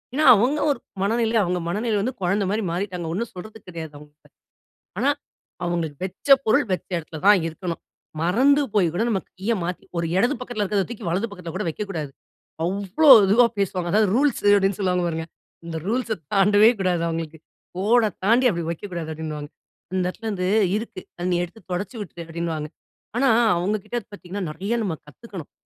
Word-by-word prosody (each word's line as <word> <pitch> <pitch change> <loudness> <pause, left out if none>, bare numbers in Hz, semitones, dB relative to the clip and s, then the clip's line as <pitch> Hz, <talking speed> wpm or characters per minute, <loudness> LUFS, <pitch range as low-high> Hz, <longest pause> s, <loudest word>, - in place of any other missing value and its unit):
ஏன்னா 310 - +2
அவுங்க 250 +8 +2
ஒரு 280 - -2 0.2
மனநிலை, 225 +2 +1
அவுங்க 180 0 -1
மனநிலை 215 +4 0
வந்து 250 +6 -1
குழந்தைமாரி 200 +3 0
மாறிட்டாங்க. 180 -1 -3
ஒன்னும் 230 +6 -3
சொல்றதுக்கு 215 +3 -11
கிடையாது, 165 -3 -7
அவுங்கக்கிட்ட. 150 +1 -18 0.7
ஆனா, - - +2 0.6
அவுங்களுக்கு 170 -4 -2
வெச்ச 190 - -9 0.2
பொருள், 250 +7 +3
வெச்ச 185 - -4
இடத்துல 160 -1 -7
தான் 205 -3 +7
இருக்கணும். 165 +1 -5 0.4
மறந்து 260 - +4
போய் 185 -5 +4
கூட 190 +6 0
நம்ம 195 -5 0 0.2
கீய 200 +5 0
மாத்தி, 180 +1 -4
ஒரு 170 - 0
இடது 245 +9 +2
பக்கத்துல 245 -4 -3
இருக்கிறத 200 -1 0
தூக்கி, 225 -3 -7
வலது 190 +7 0
பக்கத்துல 180 -4 -8
கூட 190 - -2
வைக்கக்கூடாது. 165 -5 -4 0.5
அவ்ளோ 200 - +2 0.2
இதுவா 235 +5 +6
பேசுவாங்க. 180 -3 -1
அதாவது 215 +2 +4
ரூல்ஸ் 280 0 +2
அப்பிடின்னு 200 -1 +4
சொல்லுவாங்க 180 -2 +1
பாருங்க. 165 -1 -3 0.4
இந்த 165 -1 -4
ரூல்ஸ 230 0 0 0.2
தாண்டவே 205 +2 +6
கூடாது 180 -3 +1
அவுங்களுக்கு. 165 -1 -4 0.4
"கோட 225 +5 +3 0.2
தாண்டி 235 +5 +4
அப்பிடி 170 -5 -2
வைக்கக்கூடாது" 170 -2 -5
அப்பிடின்னுவாங்க. 155 -2 -6 0.5
"இந்த 185 - +1
இடத்துலேருந்து 195 -2 -3 0.3
இருக்கு. 220 -4 -6 0.2
அத 175 0 -3
நீ - - +2
எடுத்து 175 +6 -16
தொடச்சி 200 +7 -4
விட்டுரு" 175 -4 -8
அப்பிடின்னுவாங்க. 165 -2 -4 0.5
ஆனா, 270 +2 +3 0.3
அவுங்கக்கிட்ட 205 +6 -2
பார்த்தீங்கன்னா, 195 0 -6
நிறைய 190 +8 -3
நம்ம 185 -6 -2
கத்துக்கணும். 180 - -10
190 Hz, 160 wpm, -23 LUFS, 170-220 Hz, 0.7 s, தான்